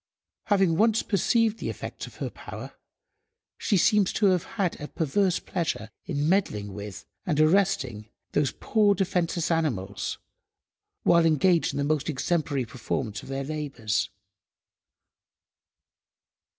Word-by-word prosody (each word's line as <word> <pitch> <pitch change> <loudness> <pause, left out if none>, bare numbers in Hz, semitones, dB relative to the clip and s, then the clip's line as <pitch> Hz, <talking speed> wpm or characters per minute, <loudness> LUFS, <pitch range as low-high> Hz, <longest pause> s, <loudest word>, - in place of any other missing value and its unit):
Having 195 -6 +3
once 225 +2 +3
perceived 225 +2 +2
the - - -3
effects - - -6
of - - -13
her - - -4
power - - -9 0.9
she 205 - +2
seems 200 +2 +4
to 215 - +1
have 180 -3 +1
had 190 -7 0
a 150 - -4
perverse 180 +5 +1
pleasure 155 - -3 0.2
in 150 -4 0
meddling 105 - +1
with 100 -1 -7 0.2
and 150 - 0
arresting 155 - +2 0.2
those 145 -2 +1
poor 210 -2 +2
defenceless 175 -3 0
animals, 115 - -1 0.9
while 170 -1 +5
engaged 165 +2 +3
in - - -4
the 140 - +1
most 150 +1 0
exemplary 145 -2 0
performance 115 -3 -3
of - - -12
their 135 0 -2
labours. 135 -7 -2
160 Hz, 125 wpm, -27 LUFS, 135-190 Hz, 0.9 s, while